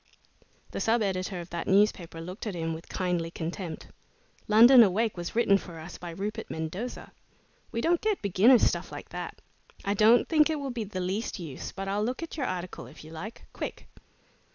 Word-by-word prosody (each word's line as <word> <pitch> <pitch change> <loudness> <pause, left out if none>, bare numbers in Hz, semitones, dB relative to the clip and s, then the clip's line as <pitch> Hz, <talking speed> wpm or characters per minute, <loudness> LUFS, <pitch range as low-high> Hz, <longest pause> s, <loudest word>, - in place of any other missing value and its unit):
The - - -4
sub 225 0 +2
editor 185 -1 -2
of 170 - -11
that 170 -1 -4
newspaper 190 -4 +2
looked 185 +7 -6
at 200 - -3
him 165 -1 -2
with 160 +1 -9
kindly 180 -3 -1
contempt. 165 0 -5 0.6
"'London 235 +4 +9
Awake' 220 +2 +3
was 175 +2 -5
written 200 -4 +4
for 170 -3 -10
us 160 +2 -9
by 175 - -7
Rupert 210 +6 -4
Mendosa. 180 +10 -5 0.6
We 230 -1 -2
don't 340 +4 +2
get 430 -2 +1
beginner's 210 +6 +5
stuff - - +1
like - - -8
that. - - -6 0.5
I 200 - +1
don't 220 +4 +5
think 310 -1 +4
it 310 -2 -1
will 275 -2 -3
be 235 -3 -3
the 190 -2 -5
least 195 +6 -2
use, 160 -8 -6
but 195 0 -6
I'll 200 +2 0
look 250 +7 -2
at 330 - -6
your 280 -5 -1
article 185 -1 -5
if - - -13
you 155 - -11
like 190 +8 -8
quick!" - - -6
195 Hz, 195 wpm, -28 LUFS, 175-230 Hz, 0.6 s, London